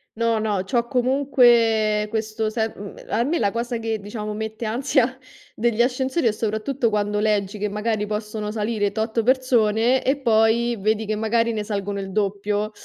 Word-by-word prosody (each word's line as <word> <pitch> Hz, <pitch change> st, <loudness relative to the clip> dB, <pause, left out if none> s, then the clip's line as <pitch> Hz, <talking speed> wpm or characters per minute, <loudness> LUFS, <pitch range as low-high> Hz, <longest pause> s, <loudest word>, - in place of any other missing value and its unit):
No, 230 Hz, 0 st, +1 dB
no, 210 Hz, -3 st, -1 dB
c'ho 240 Hz, +6 st, 0 dB
ecomunque 235 Hz, -4 st, +3 dB
questo 220 Hz, 0 st, -2 dB
se 220 Hz, 0 st, -2 dB
uhm, 200 Hz, 0 st, -9 dB
a 220 Hz, -, +1 dB
me 310 Hz, +7 st, 0 dB
la 205 Hz, -7 st, +1 dB
cosa 235 Hz, +2 st, -3 dB
che, 225 Hz, -1 st, -3 dB
diciamo, 210 Hz, +1 st, -5 dB
mette 220 Hz, +2 st, -5 dB
ansia 250 Hz, +2 st, +1 dB, 0.4 s
degli 235 Hz, 0 st, -1 dB
ascensori 260 Hz, +5 st, -1 dB
è 230 Hz, -, +4 dB
soprattutto 225 Hz, +4 st, -1 dB
quando 210 Hz, -1 st, 0 dB
leggi 210 Hz, -1 st, 0 dB
che 210 Hz, -, -1 dB
magari 210 Hz, 0 st, -2 dB
possono 210 Hz, 0 st, -4 dB
salire 210 Hz, -1 st, -1 dB
tot 220 Hz, +2 st, -1 dB
persone 245 Hz, -1 st, +2 dB
e 270 Hz, +2 st, +1 dB
poi 235 Hz, 0 st, +2 dB
vedi 215 Hz, +2 st, 0 dB
che 215 Hz, -, -2 dB
magari 230 Hz, +2 st, +1 dB
ne 215 Hz, -1 st, -2 dB
salgono 200 Hz, -1 st, -3 dB
il 195 Hz, -1 st, -6 dB
doppio. 205 Hz, +1 st, -1 dB
220 Hz, 170 wpm, -22 LUFS, 210-235 Hz, 0.4 s, è